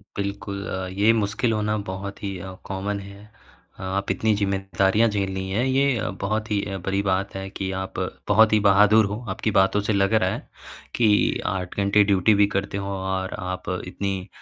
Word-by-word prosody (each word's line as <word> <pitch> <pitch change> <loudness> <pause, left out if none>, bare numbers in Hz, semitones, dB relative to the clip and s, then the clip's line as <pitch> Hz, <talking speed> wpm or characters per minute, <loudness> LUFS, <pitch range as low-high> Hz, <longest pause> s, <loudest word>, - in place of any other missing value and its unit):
बिल्कुल। 100 0 -4
अ, 95 0 -3
ये 110 +2 +6
मुश्किल 110 +2 0
होना 105 0 0
बहुत 100 +1 -6
ही 100 -2 -3
अ, 95 +1 -7
कॉमन 100 +1 -3
है, 100 +2 -12 0.5
आप 95 +1 -2
इतनी 110 +3 +1
ज़िम्मेदारियाँ 95 +2 +1
झेलनी 95 -2 -2
हैं 115 +6 +1
ये 135 -3 +2 0.2
बहुत 110 +2 -1
ही 100 -1 +2 0.2
बड़ी 95 +1 +1
बात 95 +1 0
है 95 0 -5
कि 95 -1 -4
आप 95 - -6 0.3
बहुत 110 0 +5
ही 105 - +5
बहादुर 105 +2 +5
हो, 105 +3 -4
आपकी 105 +3 -1
बातों 95 +2 +3
से 105 +1 -1
लग 100 +2 +2
रहा 95 -4 +3
है - - -5 0.5
कि 105 -3 +3
8 90 -2 -3
घंटे 100 +1 +4
ड्यूटी 100 +1 +3
भी 100 0 +4
करते 100 0 -1
हो 100 0 -3
और 95 0 -3
आप 90 0 -5 0.2
इतनी 95 0 -3
100 Hz, 180 wpm, -24 LUFS, 95-105 Hz, 0.5 s, ये